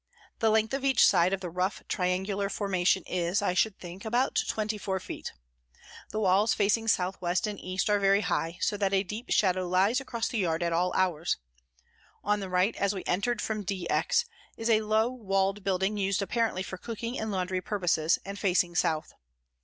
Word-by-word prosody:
The 225 - +3
length 220 +2 +2
of 270 0 -2
each 270 -1 +5
side 180 -1 +4
188 - - -1
of 190 - -14
the 180 - -4
rough, 185 +3 -2
triangular 190 +2 -1
formation 190 -3 +1
is, 180 +2 0
I 200 -3 0
should 195 +3 +1
think, 180 +2 -9
about 240 +4 +1
twenty 215 -1 -2
four 190 -1 -2
feet. - - -7 0.8
The 215 - -3
walls 205 +2 +3
facing 215 +2 +1
south 185 -3 +1
west 175 +2 0
and 210 -2 -4
east 185 0 -2
are 205 -1 +3
very 200 +1 +4
high, 170 -3 -1
so 205 - +1
that 200 -1 +1
a 190 - +2
deep 210 +6 -7
shadow 185 -2 +2
lies 195 +8 +2
across 235 -3 -3
the 230 - -2
yard 170 -3 0
at 170 -1 0
all 180 +2 +1
hours; 175 -3 +1 0.9
on 210 0 +1
the 195 -2 -5
right, 185 +4 +2
as 200 0 0
we 190 - -5
entered 210 +5 0
from 215 -1 -2
D 190 -1 -3
X, 470 - +2 0.3
is 225 +1 0
a 220 -1 +4
low 215 +1 +2
walled 195 -5 -1
building 190 +2 0
used 195 0 0
apparently, 225 -3 0
for 190 -1 -7
cooking 230 +3 -5
and 220 - -3
laundry 185 -1 -1
purposes 175 -5 +1
and 200 +1 -6
facing 180 -3 +2
south. 160 -2 0
195 Hz, 200 wpm, -28 LUFS, 185-215 Hz, 0.9 s, each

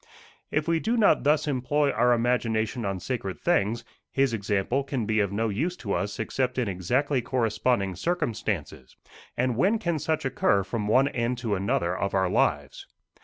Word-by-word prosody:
If 150 +1 -1
we 165 -1 +2
do 230 +7 0
not 210 - +4
thus 150 +2 +2
employ 140 +2 +1
our 125 -1 +3
imagination 115 -1 0
on 95 -1 -2
sacred 100 -4 -4
things, 120 - +1 0.3
his 135 -3 +1
example 105 +5 0
can 135 -4 -3
be 110 0 +1
of 100 -2 +1
no 110 +2 0
use 160 - -2
to 100 -5 -3
us 105 0 -2
except 125 +3 -1
in 125 -3 0
exactly 125 +9 0
corresponding 115 -4 0
circumstances 105 - -3 0.4
and 125 0 +1
when 195 - +3
can 170 -7 -1
such 155 0 -1
occur 100 -6 +2
from 105 +2 -3
one 130 +6 +4
end 120 -2 -1
to 110 - 0
another 95 -2 0
of 100 +1 -2
our 95 -1 +2
lives? 75 -5 0
120 Hz, 170 wpm, -26 LUFS, 100-140 Hz, 0.4 s, not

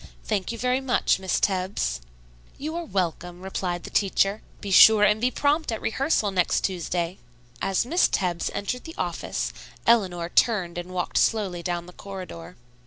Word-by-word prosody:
"Thank 185 - -1
you 230 - -5
very 250 +3 +1
much, 255 -6 +2
Miss 190 -1 0
Tebbs." 185 - -1 0.6
"You 310 +3 -5
are 340 0 -3
welcome," 180 - -3
replied 180 -2 -3
the - - -8
teacher. 195 +1 +1 0.2
"Be 200 - -6
sure 215 +2 +8
and 210 +1 +4
be 250 - +3
prompt 290 +2 +1
at 220 - -3
rehearsal 240 -4 0
next 180 -2 +1
Tuesday." 175 -1 -2 0.4
As 195 +3 +1
Miss 340 +8 +3
Tebbs 175 -3 -1
entered 250 +5 -3
the 325 +1 -9
office, - - -3 0.3
Eleanor 185 -7 +2
turned 180 -5 +2
and 175 +1 -7
walked 180 -1 -1
slowly 195 -6 +1
down 175 0 -3
the 180 - -13
corridor. 185 - -9
195 Hz, 165 wpm, -25 LUFS, 175-230 Hz, 0.6 s, sure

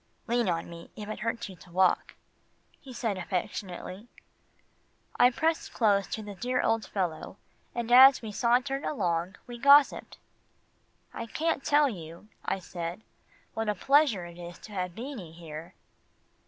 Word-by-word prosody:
"Lean 235 -3 +1
on 165 -1 -1
me, 170 0 -11
if 210 -1 -7
it 215 - -5
hurts 230 +1 -2
you 190 - -10
to 175 - -17
walk," 185 +1 +2 0.6
he 270 - -12
said 225 -5 -2
affectionately. 185 +2 -4 1.1
I 245 - +8
pressed 320 +6 -1
close 200 -4 +3
to 220 - -5
the 205 -1 -7
dear 250 +6 -1
old 225 -2 +1
fellow, 180 -5 -3 0.4
and 235 0 -3
as 265 +2 +9
we 220 - -5
sauntered 250 +5 +1
along, 180 - -1
we 240 -1 -9
gossiped. 280 +2 +5 1.0
"I 230 - -5
can't 315 +3 -1
tell 295 0 +4
you," 170 - -8
I - - -1
said, 175 +1 -6 0.5
"what 225 -1 -2
a 210 - 0
pleasure 270 - +3
it 170 0 -11
is 175 0 -8
to 215 - -11
have 180 -3 -3
Beanie 230 - -7
here." 165 -1 -9
215 Hz, 155 wpm, -29 LUFS, 180-245 Hz, 1.1 s, as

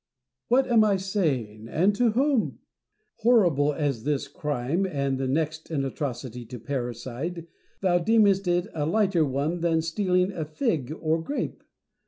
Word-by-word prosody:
What 260 +3 +4
am 235 -3 +4
I 205 -2 +3
saying 140 - -2
1 - - -10
and 185 +10 +2
to 235 -2 +3
whom? 270 -1 +1 0.6
Horrible 175 - +4
as 145 -3 -1
is 110 - -15
this 145 0 -1
crime, 145 +5 -1
and 140 -5 -1
next 155 +2 -1
in 145 -4 -1
atrocity 125 -3 -4
to 125 +2 -8
parricide, 130 +7 -4 0.4
thou 180 -2 +3
deemest 200 0 +3
it 175 0 +2
a 150 -2 -1
lighter 195 -3 +2
one 145 +5 -1
than 165 -1 +1
stealing 180 +2 +1
a 165 -5 -4
fig 155 - -1
or 160 0 0
grape. 285 - -4
160 Hz, 155 wpm, -26 LUFS, 140-195 Hz, 0.6 s, What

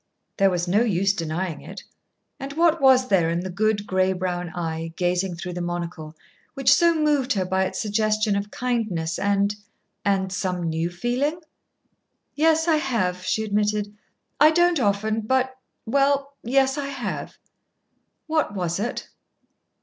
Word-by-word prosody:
There 195 -1 +4
was 175 -1 -1
no 200 +5 +3
use 195 -4 +2
denying 165 -1 -3
it. - - -10 0.6
And 275 +1 -6
what 330 0 +3
was 260 -1 +5
there 175 -4 +3
in 170 +1 -1
the 185 0 -5
good 205 +2 0
gray 185 -1 +1
brown 180 -1 -3
eye, 165 -1 -4
gazing 180 +1 0
through 180 +1 -6
the 175 - -4
monocle, 170 -2 -5 0.4
which 270 0 +4
so 335 +4 +4
moved 295 -4 +2
her 190 -3 -1
by 190 +1 +1
its 185 - -4
suggestion 215 -1 +1
of 200 +1 -2
kindness 215 -11 -2
and 200 +1 +1 0.5
and 190 -2 +1
some 180 -2 -2
new 165 +1 -1
feeling? 245 - -1 0.9
"Yes, 320 +2 +2
I 320 -2 +4
have," 185 -11 -1
she 220 +4 0
admitted. 210 0 -1 0.4
"I 305 +2 +8
don't 345 0 +3
often 215 0 0
but 260 +3 0 0.3
well, 280 +3 +1
yes, 270 +3 +2
I 280 - -3
have." 275 - -5 0.9
"What 310 -9 0
was 175 -1 -2
it?" 235 +4 -3
205 Hz, 150 wpm, -24 LUFS, 180-265 Hz, 0.9 s, I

